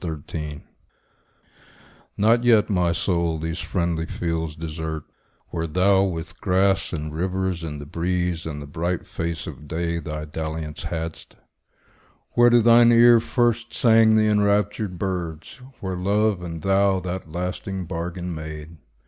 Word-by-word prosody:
XXIV 75 -2 -6 1.5
NOT 115 +3 +4
yet, 115 -3 +4
my 90 -3 +2
soul, 85 -2 0
these 80 +2 -4
friendly 85 -3 -1
fields 80 -2 -3
desert, 80 -1 -5 0.5
Where 85 -1 -3
thou 95 +4 +3
with 80 -3 -5
grass, 95 0 +2
and 75 -2 -4
rivers, 95 +1 -2
and 75 -3 -5
the 75 - -8
breeze, 85 +1 -2
And 75 -2 -5
the 70 - -7
bright 85 +5 -3
face 85 -1 -4
of 75 - -9
day, 85 +2 -2
thy 75 -2 -5
dalliance 80 0 -5
hadst; 80 0 -5 1.0
Where 120 0 +5
to 120 -1 +5
thine 120 +1 +7
ear 120 0 +7
first 120 0 0
sang 110 -2 +5
the 110 0 +4
enraptured 105 -2 +1
birds; 85 - -4 0.2
Where 95 -1 -3
love 100 +1 +1
and 85 -2 -6
thou 95 0 +3
that 90 -2 -5
lasting 90 +2 -4
bargain 85 +1 -4
made. 80 0 -8
90 Hz, 140 wpm, -23 LUFS, 80-100 Hz, 1.5 s, thine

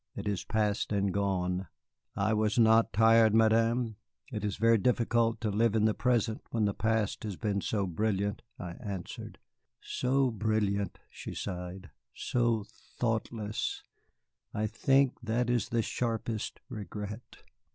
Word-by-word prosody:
It - - -5
is 100 -3 -1
past 105 -2 0
and 100 -2 +1
gone." 95 -2 0 0.5
"I 105 +2 +1
was 110 0 +1
not 115 -1 +5
tired, 110 0 +5
Madame. 115 0 +3 0.3
It 105 -4 -4
is 105 -2 -2
very 115 +1 +4
difficult 115 0 +2
to 110 -2 0
live 110 +2 +2
in 110 -1 +3
the 110 - +3
present 115 -3 +1
when 110 -2 +1
the 100 - +1
past 110 -1 0
has 105 -3 -4
been 100 +1 -1
so 100 -1 0
brilliant," 100 +2 -1 0.2
I 90 - -6
answered. 100 -7 -6 0.4
"So 130 0 +1
brilliant!" 105 -3 0
She - - -8
sighed. 90 +1 -6 0.2
"So 115 -4 0 0.3
thoughtless, 110 -2 -2 0.7
I 105 - 0
think 135 +5 +2
that 120 +1 0
is 120 -2 0
the 115 -1 +1
sharpest 115 -2 -3
regret." 105 +2 -7
110 Hz, 140 wpm, -30 LUFS, 100-115 Hz, 0.7 s, not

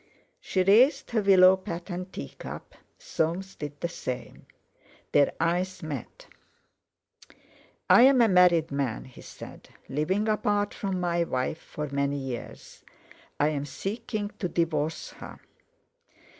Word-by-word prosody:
She 190 - 0
raised 250 +10 +4
her 225 -2 +1
willow 190 -2 +7
patterned 180 0 -6
tea 70 - -6
cup; - - -9 0.2
Soames 175 +4 -2
did 145 -1 -7
the 170 - -1
same. 130 -7 -7 0.6
Their 145 - +4
eyes 180 +3 -1
met. 145 -7 -7 1.6
"I - - +7
am 265 +1 +6
a 235 - +6
married 180 -5 +4
man," 140 -5 -2
he 130 - -14
said, - - -12 0.2
"living 185 +10 0
apart 205 -1 0
from 195 -2 -3
my 170 -1 +1
wife 130 +1 -2
for 150 0 -6
many 140 0 -1
years. 130 -3 -7 0.6
I 145 - +3
am 145 -2 -3
seeking 210 - -4
to 180 - -2
divorce 160 -2 -1
her." - - -11
175 Hz, 130 wpm, -27 LUFS, 145-195 Hz, 1.6 s, willow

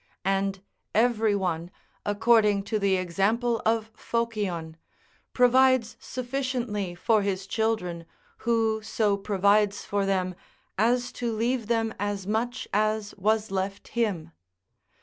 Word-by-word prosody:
And 195 0 0 0.3
every 220 -2 +3
one, 175 -3 -2 0.4
according 210 -1 +3
to 215 +1 -1
the 200 -1 +2
example 205 +7 0
of 225 0 +1
Phocion, 205 -9 -2 0.6
provides 250 -2 +4
sufficiently 245 -7 -3
for 215 +4 +2
his 195 -1 -2
children 195 -6 -1 0.3
who 225 -2 +1
so 215 -1 +1
provides 200 +1 +2
for 200 -1 0
them 185 -2 0 0.4
as 245 +4 +1
to 240 -1 -3
leave 230 +1 -1
them 225 -1 0
as 205 -2 -2
much 225 +4 -2
as 215 0 0
was 215 +1 0
left 195 +1 -3
him. 210 -9 -1
215 Hz, 115 wpm, -27 LUFS, 195-230 Hz, 0.6 s, provides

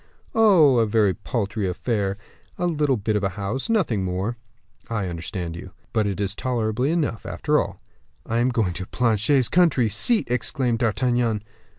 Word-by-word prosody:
"Oh, 170 - +5
a 115 - +2
very 105 -3 +2
paltry 105 -3 -3
affair; 100 0 -2 0.4
a 175 - -1
little 150 -6 +1
bit 105 +1 -1
of 105 - 0
a 95 - +1
house 105 - -3
nothing 160 - +1
more." 95 +5 -2 0.5
"I 110 -4 -1
understand 85 0 -5
you." 90 +2 -10 0.2
"But 110 -2 +1
it 100 -1 -3
is 100 -1 -1
tolerable 120 -1 -1
enough, 150 -9 -1
after - - 0
all." - - -4 0.5
"I 115 +1 -1
am 120 +2 +2
going 110 -8 0
to 95 +1 -6
Planchet's 120 +2 +2
country 160 -10 +3
seat!" 210 - +4
exclaimed 125 0 0
D'Artagnan. 120 -1 0
115 Hz, 165 wpm, -23 LUFS, 100-130 Hz, 0.5 s, Oh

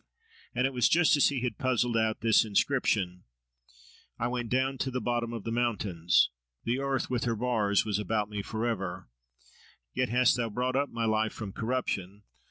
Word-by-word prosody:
And 125 - +2
it 135 - -1
was 125 -1 +3
just 165 -2 +5
as 145 - +4
he 135 -4 -2
had 120 -4 -3
puzzled 125 -2 +1
out 110 -1 +1
this 115 -2 +5
inscription— 100 -5 0 0.9
I 120 - -1
went 120 -2 -3
down 130 +2 0
to 135 - -1
the 130 0 -2
bottom 120 -1 -1
of 115 -3 -5
the 115 - -4
mountains. 105 - +1 0.3
The 120 +3 0
earth 135 -2 -1
with 125 -1 0
her 115 -1 0
bars 110 -3 +1
was 105 -2 0
about 105 0 -1
me 105 -1 -4
for 110 +3 -3
ever: 95 -6 -3 0.9
Yet 130 -1 0
hast 125 +1 +4
Thou 115 -2 -1
brought 125 +4 -1
up 140 0 +1
my 115 -1 -2
life 110 0 +1
from 105 -4 -6
corruption! 105 -5 -3
115 Hz, 185 wpm, -29 LUFS, 105-125 Hz, 0.9 s, just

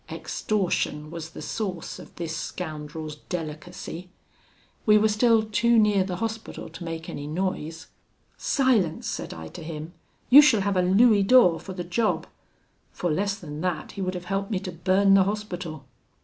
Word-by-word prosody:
"Extortion 170 -7 -2
was 165 -1 -6
the - - -9
source 190 -7 -4
of - - -13
this 165 -2 -4
scoundrel's 155 -3 -6
delicacy. 175 +1 -6 0.7
We 210 -1 +6
were 215 +1 +4
still 220 +1 +3
too 230 +2 +2
near 210 -3 +4
the 185 -1 -4
Hospital 225 +2 -5
to - - -9
make 165 -1 -5
any 145 - -6
noise. 165 -1 -3 0.5
'Silence!' 235 - +1
said - - -4
I 80 0 -8
to - - -10
him, 160 +1 -7 0.4
'you 285 +4 +12
shall 255 -9 +4
have 200 0 0
a 185 - +3
louis 205 +4 +5
d'or 195 -5 +5
for 190 - -8
the 180 -1 -4
job': 215 +6 0 0.7
for 175 - -2
less 200 +5 0
than 150 -5 -7
that 180 -3 -2
he 195 - -7
would 185 0 -2
have 180 0 -6
helped 195 +2 -2
me 210 - 0
to 190 -2 -5
burn 190 +3 +3
the 195 -1 +6
Hospital. 180 -8 -4
185 Hz, 170 wpm, -26 LUFS, 165-210 Hz, 0.7 s, you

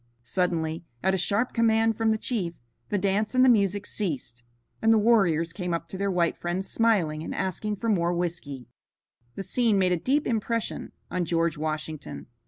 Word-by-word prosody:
Suddenly, 165 +3 -1 0.2
at 190 +1 +3
a - - +2
sharp 205 +7 +1
command 225 -1 +3
from 225 +1 +1
the 220 - +2
chief, 195 -8 -2 0.3
the 205 - +1
dance 200 +5 0
and 255 0 +6
the - - +6
music 205 -3 +2
ceased, 145 - -4 0.4
and 225 - +4
the 225 - +6
warriors 190 -8 +3
came 180 -2 -2
up 165 0 -5
to - - -7
their 200 0 0
white 175 -3 +1
friends 175 +2 -3
smiling 185 -10 +2
and - - -5
asking 210 +3 -2
for 230 - -4
more 175 -5 +2
whiskey. 165 -8 -3 0.7
The 195 - -4
scene 220 +2 +2
made 185 -1 +3
a 180 - +3
deep 275 - +1
impression 230 0 -2 0.2
on 180 -1 0
George 165 -1 +1
Washington. 155 -1 -4
190 Hz, 185 wpm, -26 LUFS, 170-220 Hz, 0.7 s, and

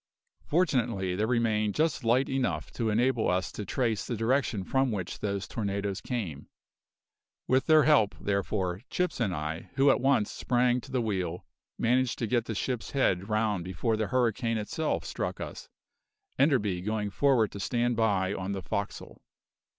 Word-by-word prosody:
Fortunately, 120 - +1
there 105 +3 0
remained 110 -3 +1
just 155 -3 +1
light 120 +4 +3
enough 135 -2 -1
to 115 -2 -1
enable 120 +2 +2
us 90 +1 0
to 105 - -5
trace 115 -4 0
the 120 - -2
direction 115 -2 +1
from 135 +5 +1
which 95 -5 -4
those 100 -2 -2
tornadoes 100 -2 -3
came. 95 - -4 1.0
With 130 +1 +2
their 155 -2 +6
help, 140 -9 +4
therefore, 95 -2 -1
Chips 180 -5 -1
and 110 -5 +1
I, 80 0 -4
who 135 0 +5
at - - +1
once 130 -6 +2
sprang 125 0 +1
to - - -12
the 125 -2 0
wheel, 90 -5 -2 0.3
managed 125 +1 +1
to 115 - -1
get 120 0 +1
the 110 - -4
ship's 125 +3 -2
head 100 -8 +1
round 110 -4 +1
before 95 +6 -1
the 110 -1 -1
hurricane 115 -2 +1
itself 150 +9 -2
struck - - -3
us, - - -7 0.7
Enderby 105 - +2
going 105 +1 -2
for'ard 125 -4 +3
to 100 - -7
stand 120 +4 0
by 100 -4 +1
on 95 +1 -3
the 95 -2 -5
forecastle. 100 +4 -5
110 Hz, 165 wpm, -29 LUFS, 100-125 Hz, 1.0 s, their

